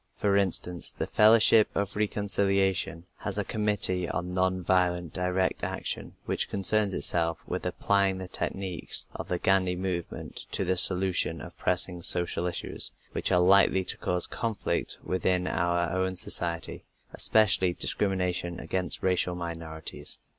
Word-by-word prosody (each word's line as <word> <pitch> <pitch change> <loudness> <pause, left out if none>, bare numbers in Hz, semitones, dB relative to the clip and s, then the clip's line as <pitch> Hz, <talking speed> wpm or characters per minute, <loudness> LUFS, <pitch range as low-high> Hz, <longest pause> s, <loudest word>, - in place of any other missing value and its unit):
For 100 -1 +1
instance, 90 -3 -1
the - - -4
Fellowship 110 0 +6
of 100 -1 -2
Reconciliation 100 -4 0
has 100 -1 -4
a 105 - 0
committee 100 -4 +2
on 90 0 -4
non 95 0 0
violent 90 -2 0
direct 90 +1 -1
action - - -4
which - - -1
concerns 100 0 +1
itself 85 -1 -1
with - - -4
applying 100 -1 +1
the 95 -1 -6
techniques 95 -1 -1
of - - -7
the 90 - -1
Gandhi 95 -1 +2
movement 90 -2 -5
to 95 - 0
the 95 +1 +1
solution 90 -2 +2
of - - -10
pressing 90 -1 -1
social 85 0 +2
issues 90 - -2 0.2
which - - -1
are 90 - +4
likely 95 +1 +5
to - - -2
cause 90 0 0
conflict 115 -4 -2
within 90 0 0
our 85 -2 0
own 95 0 -1
society, 85 -1 -1 0.3
especially 105 -4 +3
discrimination 90 -3 -1
against 90 -1 -3
racial 90 -1 +1
minorities. 80 -2 -5
90 Hz, 140 wpm, -27 LUFS, 90-95 Hz, 0.3 s, Fellowship